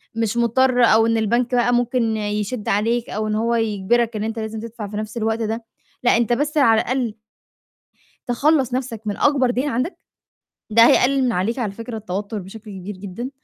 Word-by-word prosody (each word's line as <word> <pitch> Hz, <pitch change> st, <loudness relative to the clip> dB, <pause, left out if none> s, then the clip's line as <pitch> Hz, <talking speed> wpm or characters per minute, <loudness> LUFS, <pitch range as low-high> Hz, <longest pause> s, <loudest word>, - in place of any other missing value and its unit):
مش 230 Hz, 0 st, -1 dB
مضطر 245 Hz, +2 st, +3 dB
أو 225 Hz, -1 st, +5 dB
إن 230 Hz, 0 st, +2 dB
البَنْك 235 Hz, +3 st, +1 dB
بقى 245 Hz, 0 st, +2 dB
ممكن 240 Hz, -2 st, +1 dB
يشِد 210 Hz, +1 st, -3 dB
عليك 230 Hz, +4 st, 0 dB
أو 215 Hz, +1 st, -2 dB
إن 215 Hz, -, -1 dB
هو 230 Hz, +2 st, +1 dB
يجبرك 225 Hz, +1 st, +1 dB
إن 210 Hz, -, -2 dB
أنت 225 Hz, +1 st, -3 dB
لازم 220 Hz, 0 st, -4 dB
تدفع 225 Hz, -2 st, -7 dB
في 205 Hz, -, -6 dB
نَفْس 215 Hz, +2 st, -5 dB
الوقت 220 Hz, 0 st, 0 dB
ده. 225 Hz, +1 st, -3 dB, 0.4 s
لأ، 240 Hz, -, +4 dB
أنت 240 Hz, 0 st, +1 dB
بس 295 Hz, +5 st, -1 dB
على 225 Hz, -6 st, +5 dB
الأقل 245 Hz, -4 st, -2 dB, 1.1 s
تخلَّص 265 Hz, +1 st, +2 dB
نفَسْك 245 Hz, -4 st, -3 dB
من 205 Hz, 0 st, -2 dB
أكبر 275 Hz, -4 st, +3 dB
دَيْن 260 Hz, +4 st, -1 dB
عندك، 255 Hz, +10 st, -2 dB, 0.7 s
ده 230 Hz, +2 st, +7 dB
هيقلِّل 270 Hz, +1 st, +4 dB
من 245 Hz, -, +2 dB
عليك 225 Hz, +7 st, -1 dB
على 215 Hz, -5 st, -1 dB
فكرة 230 Hz, +2 st, -7 dB
التوتُّر 205 Hz, +1 st, -4 dB
بشكل 205 Hz, +3 st, -10 dB
كبير 190 Hz, +1 st, -7 dB
جدًا. 200 Hz, +6 st, -6 dB
230 Hz, 190 wpm, -21 LUFS, 215-245 Hz, 1.1 s, ده